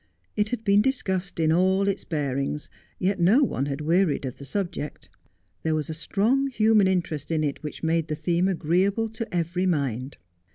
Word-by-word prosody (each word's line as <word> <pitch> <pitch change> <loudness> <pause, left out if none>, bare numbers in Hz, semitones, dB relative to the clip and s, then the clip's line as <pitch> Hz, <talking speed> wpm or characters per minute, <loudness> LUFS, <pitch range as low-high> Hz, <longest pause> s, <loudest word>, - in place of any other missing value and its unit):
It 210 0 +1
had 240 -1 -3
been 200 -1 +4
discussed 190 -9 -1
in 160 -1 +3
all 190 +3 +3
iU> 200 - +3
Dealings, 145 -3 -3 0.3
yet 190 +1 0
no 205 +12 +5
one 140 - -1
had 140 +1 -3
wearied 165 -1 +2
of 125 - -5
the 140 - -8
subject. 170 -2 -4 0.5
There 160 -1 0
was 155 +1 -2
a - - -3
strong 220 - +1
human 220 -5 +4
interest 170 -6 -1
in 160 -2 0
it 145 -2 -2
which 150 +1 -7
made 165 0 +1
the 155 - -2
theme 170 +4 +1
agreeable 190 +5 +1
to 225 +1 -6
every 175 +2 0
mind. 135 -5 -1
175 Hz, 180 wpm, -25 LUFS, 155-200 Hz, 0.5 s, no